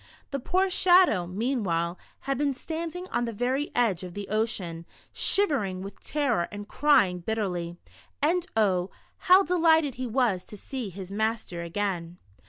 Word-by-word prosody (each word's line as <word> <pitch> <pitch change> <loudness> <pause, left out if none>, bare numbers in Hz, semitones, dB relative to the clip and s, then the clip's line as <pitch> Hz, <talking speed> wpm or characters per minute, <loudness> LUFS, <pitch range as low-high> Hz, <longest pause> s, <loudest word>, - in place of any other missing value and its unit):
The 275 - -2
poor 370 +8 +1
Shadow, 355 - +5
meanwhile, 185 -5 -1 0.2
had 275 0 -1
been 280 -1 0
standing 335 +5 -5
on 240 - 0
the 230 - -3
ver}' 255 +6 -1
edge 225 -8 +2
of 180 -1 -8
the 205 -1 -6
ocean, 190 -6 -2 0.3
shivering 225 - +1
with 195 - -9
terror 255 - 0
and 205 0 -7
crving 195 -11 +3
bitterly, 180 -5 -2 0.4
and 345 +4 +1
oh, 190 -4 +2 0.4
how 375 +2 +8
delighted 320 -5 +3
he 255 - -1
was 225 -6 +1
to 210 - -10
see 250 0 -5
his 190 0 -9
master 220 -4 -2
again. 175 -1 -3
220 Hz, 150 wpm, -27 LUFS, 185-290 Hz, 0.4 s, how